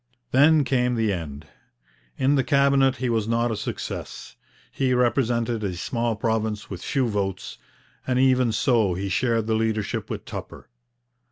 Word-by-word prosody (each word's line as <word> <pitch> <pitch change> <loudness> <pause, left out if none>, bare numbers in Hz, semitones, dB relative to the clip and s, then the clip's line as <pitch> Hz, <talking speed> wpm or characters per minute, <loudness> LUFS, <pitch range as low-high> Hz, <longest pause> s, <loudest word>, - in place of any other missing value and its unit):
Then 150 +3 +5
came 125 -2 +1
the 110 -3 +1
end. 75 -4 -6 0.7
In 135 +2 +2
the 135 -2 +2
Cabinet 140 -1 +3
he 130 0 -3
was 110 -3 0
not 115 +1 +1
a - - -1
success. 105 - -6 0.4
He 130 -2 0
represented 120 -2 +1
a 95 -3 -2
small 115 +5 -2
province 110 -1 -2
with 90 -2 -6
few 135 -4 0
votes, 100 -3 -3 0.5
and 130 -1 +1
even 130 -2 +3
so 110 -4 +2
he 95 +2 -3
shared 115 +3 +1
the 110 - 0
leadership 110 -2 -1
with - - -5
Tupper. - - -8
115 Hz, 155 wpm, -24 LUFS, 105-130 Hz, 0.7 s, Then